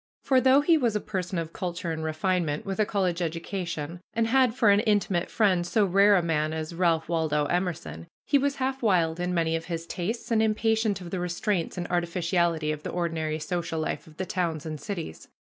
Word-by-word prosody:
For 260 -2 +3
though 265 +2 +5
he 320 +2 +4
was 235 -5 +1
a - - +2
person 185 -3 -4
of 165 -1 -4
culture 175 -2 -3
and 160 0 -4
refinement, 160 -1 -1
with 195 +1 -4
a 210 - +3
college 185 -3 0
education, 170 -1 -4
and 230 0 +2
had 250 0 +3
for 225 -5 +5
an 200 - +5
intimate 205 -5 +1
friend 190 -5 +2
so 200 +5 +2
rare 200 +2 +5
a 180 - +2
man 155 -2 0
as 160 +1 -4
Ralph 165 -2 +1
Waldo 155 -3 +1
Emerson, 175 0 -3 0.2
he 285 - +3
was 280 +1 0
half 265 0 -2
wild 175 -7 +2
in 180 0 -1
many 165 -2 +1
of 165 0 -4
his 165 -2 -4
tastes 220 +9 -4
and 220 -1 +3
impatient 220 -2 +1
of 175 -1 -8
the 185 - -2
restraints 180 +1 -1
and 175 - -2
artificiality 170 -2 0
of 150 -1 -4
the - - -5
ordinary 160 -3 -2
social 165 +1 -3
life 155 - -3
of 155 0 -16
the 190 - -2
towns 170 -4 -2
and 155 -2 -5
cities. 170 - -6
175 Hz, 210 wpm, -27 LUFS, 165-205 Hz, 0.2 s, though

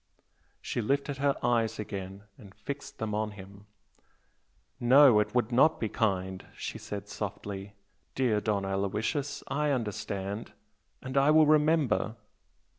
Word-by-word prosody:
She - - -2
lifted 140 +4 -1
her 140 0 +2
eyes 115 -2 +1
again 100 -2 -6
and 100 -7 -15
fixed 140 0 -7
them 110 -1 -3
on 105 +1 -1
him. 100 +1 -13 1.1
"No, 130 -1 +7
it 105 - -1
would 120 -1 +1
not 145 +6 +4
be 110 - -1
kind!" 95 -4 -1
she - - -5
said, 100 0 -6
softly 100 -1 -6 0.4
"Dear 115 -5 +1
Don 100 -2 0
Aloysius, 105 +9 -2
I 150 +2 0
understand! 105 -4 -3 0.5
And 130 +1 -4
I 135 +2 +5
will 155 0 +6
remember!" 150 -6 +2
110 Hz, 130 wpm, -29 LUFS, 100-135 Hz, 1.1 s, No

